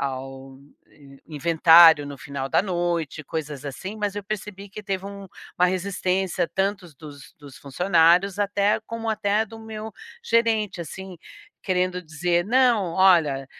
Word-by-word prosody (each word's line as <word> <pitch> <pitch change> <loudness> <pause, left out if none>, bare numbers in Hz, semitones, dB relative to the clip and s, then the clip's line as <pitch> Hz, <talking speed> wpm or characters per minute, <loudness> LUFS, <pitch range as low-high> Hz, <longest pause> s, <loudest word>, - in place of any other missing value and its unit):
ao 135 0 -6 0.7
inventário 160 0 +6
no 140 -1 -8
final 140 0 -6
da - - +2
noite, 175 -5 -2
coisas 150 -2 -6
assim. 190 +10 -7
Mas 205 -1 -2
eu 205 - -5
percebi 205 -1 -7
que, 210 - -9
teve 195 -1 -4
um 200 0 -9 0.3
uma 180 - +5
resistência 185 -1 -1
tantos 195 -4 -2
dos 145 -2 -13
dos 145 -3 -14
funcionários, 175 +5 +2
até 205 +1 +1
como, 230 -1 -4
até 210 0 0
do 225 +1 -12
meu 220 -1 -8 0.3
gerente, 225 -5 +1
assim, 185 +3 -8 0.5
querendo 180 -1 -1
dizer: 170 +2 -1
"Não, 235 -7 +2
olha, 165 -8 +3
180 Hz, 135 wpm, -23 LUFS, 155-200 Hz, 0.7 s, inventário